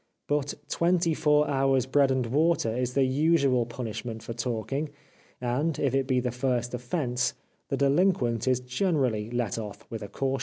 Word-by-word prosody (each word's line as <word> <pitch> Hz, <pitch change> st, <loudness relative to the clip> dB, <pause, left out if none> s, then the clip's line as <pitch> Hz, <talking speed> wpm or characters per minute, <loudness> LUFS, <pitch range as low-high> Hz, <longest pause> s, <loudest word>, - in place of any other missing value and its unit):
But 145 Hz, -1 st, 0 dB
twenty 170 Hz, +1 st, +2 dB
four 150 Hz, -1 st, +3 dB
hours' 135 Hz, -2 st, +2 dB
bread 135 Hz, +1 st, +3 dB
and 130 Hz, -2 st, +1 dB
water 140 Hz, -2 st, +1 dB
is 125 Hz, 0 st, -2 dB
the 140 Hz, -, +4 dB
usual 135 Hz, -3 st, +2 dB
punishment 115 Hz, -1 st, -5 dB
for 115 Hz, -, -5 dB
talking, 125 Hz, +5 st, -2 dB, 0.5 s
and, 130 Hz, +6 st, 0 dB
if 135 Hz, -3 st, 0 dB
it 135 Hz, -1 st, +1 dB
be 130 Hz, -1 st, +2 dB
the 125 Hz, 0 st, -1 dB
first 125 Hz, -1 st, -1 dB
offence, 125 Hz, 0 st, -1 dB, 0.3 s
the -, -, 0 dB
de 140 Hz, -, +3 dB
linquent 135 Hz, -, +2 dB
is 130 Hz, -1 st, +2 dB
generally 125 Hz, -, 0 dB
let 120 Hz, -3 st, -1 dB
off 105 Hz, 0 st, -8 dB
with 115 Hz, -1 st, -5 dB
a 100 Hz, -, -5 dB
caution. 135 Hz, +4 st, -2 dB
130 Hz, 175 wpm, -27 LUFS, 120-145 Hz, 0.5 s, the